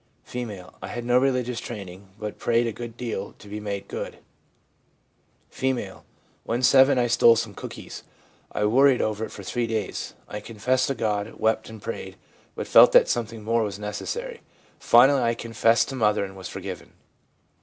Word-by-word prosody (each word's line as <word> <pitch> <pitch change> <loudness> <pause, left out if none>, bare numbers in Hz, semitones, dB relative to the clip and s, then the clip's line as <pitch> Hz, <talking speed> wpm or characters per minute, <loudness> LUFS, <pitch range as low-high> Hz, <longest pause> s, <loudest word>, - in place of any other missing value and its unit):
F. - - -14 0.4
' - - -29
I - - -6
had 120 0 -5
no 125 +1 +4
religious 125 -2 0
training, 100 -5 -8
but 105 -1 -6
prayed 120 0 +2
a 115 - -1
good 120 +1 -8
deal 110 -5 -5
to 105 - -15
be 105 +1 -6
made 100 -2 -5
good.' - - -6 1.3
F. 125 -8 -2 0.4
'When 120 +2 -2
7 130 +2 +6
I 125 - +3
stole 115 -1 +5
some 115 -2 -2
cookies. - - -8 0.5
I 105 - 0
worried 130 +4 +5
over 110 0 -1
it - - -11
for 100 - -9
three 120 +4 -2
days. 110 -2 -3
I 105 - -6
confessed 120 +4 0
to 135 - -1
God, 105 -1 -2
wept 110 0 0
and 110 -1 -10
prayed, - - -6 0.4
but - - -4
felt - - +7
that - - +6
something 115 -2 -2
more 115 +2 +1
was 100 -3 -3
necessary. 460 - -5 0.4
Finally 135 +3 +6
I 115 -1 +1
confessed 115 0 +2
to 135 - -5
mother, 105 -4 +2
and 95 0 -10
was 95 -2 -8
forgiven.' - - -7
115 Hz, 175 wpm, -25 LUFS, 105-125 Hz, 1.3 s, felt